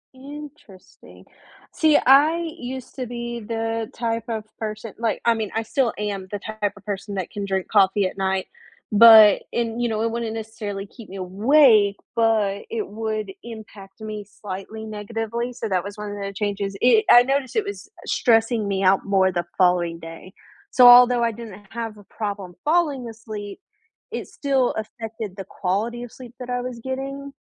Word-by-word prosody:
Interesting. 285 -7 -13 0.5
See, 310 -2 +4
I 310 +6 +5
used 255 +1 -7
to 255 -3 -4
be 240 0 -5
the 225 0 -3
type 230 -1 -2
of 220 -2 -3 0.2
person 215 0 -5
like, 230 -2 -1
I 235 - +5
mean, 220 -2 -3
I 225 - 0
still 245 +1 0
am 200 -2 -4
the 205 - -3
type 215 -1 -3
of 200 - -17
person 200 0 -5
that 185 -3 -4
can 205 -2 -4
drink 190 -1 -2
coffee 200 -1 +4
at 185 - -3
night, 190 0 0 0.5
but 220 -1 +9
in 235 0 -2
you 240 - 0
know, 220 0 -1
it 230 - 0
wouldn't 230 -1 -3
necessarily 215 -3 -5
keep 220 0 -14
me 195 - -9
awake, 205 +2 +4 0.2
but 215 -3 +2
it 445 -2 -3
would 215 -2 -3
impact 215 -3 -11
me 215 -1 -6 0.2
slightly 210 +2 -7
negatively, 225 +3 -4
so 230 -2 -5
that 185 -2 0
was 200 +1 -8
one 210 -1 -6
of 205 - -6
the 200 0 -4
changes. 200 -1 -3
I 340 - +5
I 240 0 +9
noticed 270 -1 -1
it 430 -2 +1
was 405 0 -7 0.2
stressing 225 -2 +2
me 195 -1 -1
out 190 +1 +3
more 190 -1 +3
the 175 -1 -2
following 175 -2 +2
day. 165 +3 -11 0.4
So, 250 -1 +7
although 245 0 +8
I 230 - +2
didn't 210 -3 -10
have 225 -2 -5
a 205 - -14
problem 200 -3 -5
falling 295 -7 +1
asleep, 215 - -8 0.5
it - - -5
still 270 -3 0
affected 220 -2 -6
the 195 - -6
quality 220 +6 -2
of 245 - -9
sleep 250 -2 -12
that 250 0 -7
I 245 0 -1
was 250 -1 -6
getting. 275 +1 -5
220 Hz, 180 wpm, -23 LUFS, 200-240 Hz, 0.5 s, but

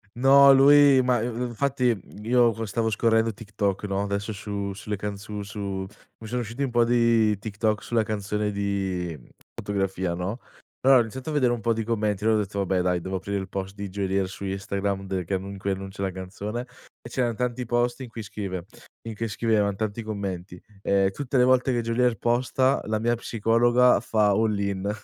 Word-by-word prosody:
No, 135 +3 +7
lui 140 0 +7
ma 125 -2 +2
i - - -1
infatti 125 +1 0 0.3
io 120 +1 +4
co 115 +1 -5
stavo 110 +2 -1
scorrendo 110 0 +2
TikTok, 100 -2 -3
no, 100 -1 -1
adesso 100 +1 -3
su 100 0 -4
sulle 105 +2 -4
canz 100 0 -5
su 105 -1 -6
su 100 -2 -4 0.3
mi 110 - -10
sono 125 +3 -2
usciti 120 +4 -4
un 135 - -2
po' 120 0 +4
di 115 -3 +3
TikTok 105 +1 -2
sulla 115 -2 +1
canzone 105 0 -2
di 95 -4 -2 0.4
"Fotografia", 95 -3 -2
no. 95 +7 -4 0.4
Allora, 135 0 +6
ho - - +5
iniziato 130 +6 -7
a - - -3
vedere 130 -5 +3
un 120 - -3
po' 115 +1 +2
di 115 0 -2
commenti, 105 -3 -1
allora 110 0 +3
ho - - +2
detto: 100 0 -5
"Vabbè 95 -1 +1
dai, 90 -1 0
devo 95 +2 -3
aprire 100 +2 -3
il 95 -1 -5
post 95 0 -5
di 100 -1 -6
Geolier 95 0 -1
su 95 +1 -8
Instagram, 100 0 -2
de 95 -2 -3
che 95 - -1
annun 95 +1 -5
in 100 - -8
cui 100 +1 -1
annuncia 95 0 -5
la 95 -1 -1
canzone", 100 +5 -5 0.4
e 120 - -10
c'eran 120 -2 -1
tanti 125 +2 -2
post 120 +2 0
in 125 - -7
cui 115 -1 -7
scrive 100 -4 -5 0.4
in 115 - -4
che 115 +2 -3
scrivevan 105 -2 +1
tanti 110 +2 -3
commenti, 95 -4 -5 0.2
ehm, 100 -1 +2
"tutte 135 +5 -2
le 125 - +5
volte 130 +1 +3
che 120 -1 +1
Geolier 115 0 +1
posta, 130 +4 +1
la 110 0 0
mia 120 +2 +1
psicologa 120 +2 +3
fa 105 -2 +2
all-in." 100 -2 0
105 Hz, 200 wpm, -25 LUFS, 100-120 Hz, 0.4 s, No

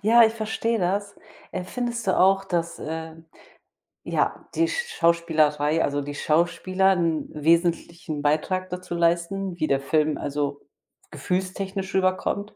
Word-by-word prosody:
Ja, 230 +3 +6
ich 220 - +2
verstehe 225 +1 -1
das. 200 +3 -1 0.4
Äh, 185 -1 -4
findest 240 0 -3
du 190 - +2
auch, 195 +1 +4
dass, 170 -3 -2
äh, 160 +1 -5 0.9
ja, - - -1
die 330 0 +3
Schauspielerei 165 - +1
also 145 0 0
die 145 +1 -6
Schauspieler 185 +5 +2
'n 165 -3 0
wesentlichen 165 0 0
Beitrag 170 +6 0
dazu 180 -1 -5
leisten, 170 +2 0
wie 155 - +1
der 135 0 +1
Film 155 +1 +1
also 145 0 -3 0.5
gefühlstechnisch 190 +1 -3
rüberkommt? 190 +2 0
175 Hz, 130 wpm, -24 LUFS, 155-195 Hz, 0.9 s, Ja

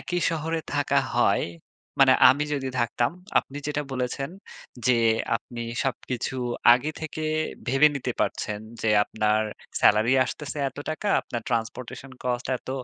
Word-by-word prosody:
একই 175 0 -2
শহরে 160 0 -2
থাকা 145 0 +2 0.2
হয়, - - +3 0.6
মানে - - +8 0.2
আমি 145 +3 +3
যদি 135 -2 -2
থাকতাম 120 0 +1 0.3
আপনি 140 - -5
যেটা 150 0 -1
বলেছেন 130 +2 -2 0.6
যে, 125 -2 +4 0.4
আপনি 120 +1 -8 0.2
সবকিছু 130 -1 -3 0.4
আগে 130 +5 +1
থেকে 155 0 -5 0.4
ভেবে 135 +4 +6
নিতে 140 - -3
পারছেন, 105 0 -1 0.2
যে 110 - +1 0.2
আপনার 110 0 +1 0.4
সেলারি 110 +4 +5
আসতেছে 150 +2 -6
এত 135 - -15
টাকা। 155 +6 -3
আপনার 120 -1 -5
ট্রান্সপোর্টেশন 120 +3 -4
কস্ট 125 -1 -2
এত - - -20
130 Hz, 135 wpm, -25 LUFS, 120-150 Hz, 0.6 s, মানে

